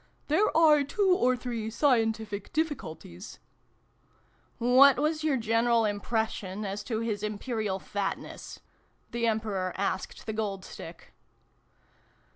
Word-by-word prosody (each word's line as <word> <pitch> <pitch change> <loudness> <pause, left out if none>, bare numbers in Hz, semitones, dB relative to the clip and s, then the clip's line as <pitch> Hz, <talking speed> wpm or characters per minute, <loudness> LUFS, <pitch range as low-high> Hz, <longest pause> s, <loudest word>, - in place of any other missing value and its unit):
" - - -39
There 315 +1 +3
are 305 -3 +6
two 375 +6 +2
or 255 -5 +2
three 235 -3 -4
scientific 225 -5 0
difficulties 185 - -4 0.6
" - - -38 0.2
What 275 0 +8
was 310 +1 0
your 300 -4 +2
general 230 0 +2
impression 210 -1 -2
as 200 +1 -4
to 225 -2 -2
His 215 -3 -2
Imperial 215 -1 -2
Fatness? 200 +1 -5 0.2
" - - -40
the 235 0 0
Emperor 210 -5 -1
asked 190 -1 -3
the 220 - -3
Gold 200 -3 -3
Stick. - - -11
225 Hz, 125 wpm, -29 LUFS, 205-265 Hz, 0.6 s, What